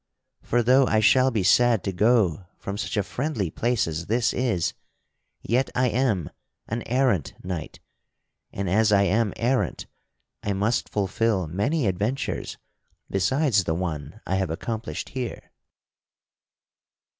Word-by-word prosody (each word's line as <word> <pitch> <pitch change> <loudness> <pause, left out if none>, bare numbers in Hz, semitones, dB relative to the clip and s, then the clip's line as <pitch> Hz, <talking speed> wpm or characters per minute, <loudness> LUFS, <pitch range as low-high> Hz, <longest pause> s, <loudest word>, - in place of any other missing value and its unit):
For, 120 0 +1
though 130 +2 +5
I 110 - +3
shall 130 +4 +5
be 110 -6 -1
sad 120 +2 +4
to 100 - -1
go 100 -3 +2
from 100 - -5
such 110 +1 -3
a 105 - +2
friendly 125 - -2
place 120 +3 0
as 80 +2 -4
this 115 +2 +1
is, 115 -10 0 0.7
yet 125 +4 +1
I 125 0 +3
am 115 - 0 0.4
an 115 +2 -3
errant 125 - +1
knight, 90 -4 -5 0.7
and 100 0 -3
as 105 +4 +3
I 100 -1 +5
am 105 +2 +2
errant 125 +2 0 0.6
I 100 - -1
must 105 +5 0
fulfil 100 -1 0
many 110 - 0
adventures 105 +8 -2 0.5
besides 105 - +2
the 80 - 0
one 80 -5 -4
I 95 - 0
have 95 -3 -1
accomplished 110 +7 -4
here." 125 -3 -6
110 Hz, 135 wpm, -25 LUFS, 95-125 Hz, 0.7 s, though